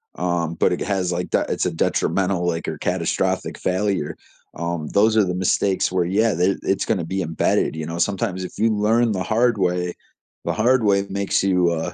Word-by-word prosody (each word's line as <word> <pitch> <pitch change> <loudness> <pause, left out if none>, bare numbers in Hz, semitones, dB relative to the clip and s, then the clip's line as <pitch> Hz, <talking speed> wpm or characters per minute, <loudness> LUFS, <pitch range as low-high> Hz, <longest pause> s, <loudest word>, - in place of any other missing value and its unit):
um, 85 -2 -1
but - - +2
it - - -3
has, 95 -3 -1
like, 90 0 -3
that - - +1
it's - - -1
a 90 - 0
detrimental, 90 +2 0
like, 85 -1 -2
or - - -3
catastrophic - - -1
failure, 95 -4 -1 0.4
um, 85 -2 -3
those 110 +2 +3
are 105 - +5
the 90 -1 -2
mistakes 95 +1 +1
where, 90 -2 +1
yeah, 105 +4 +2
they 90 +3 +2
it's 95 - 0
gonna 95 -7 0
be 95 +3 -2
embedded, 80 -1 0
you 80 -1 -4
know, 85 +1 -5
sometimes 95 -1 -1
if - - -9
you 110 +1 +2
learn 110 +3 +2
the 95 -3 -2
hard 115 +2 +2
way, 90 -2 0 0.5
the - - 0
hard 120 +2 +2
way 100 -1 +3
makes 100 0 0
you, 90 -3 +3
uh, 80 -1 -3
95 Hz, 200 wpm, -22 LUFS, 85-105 Hz, 0.5 s, are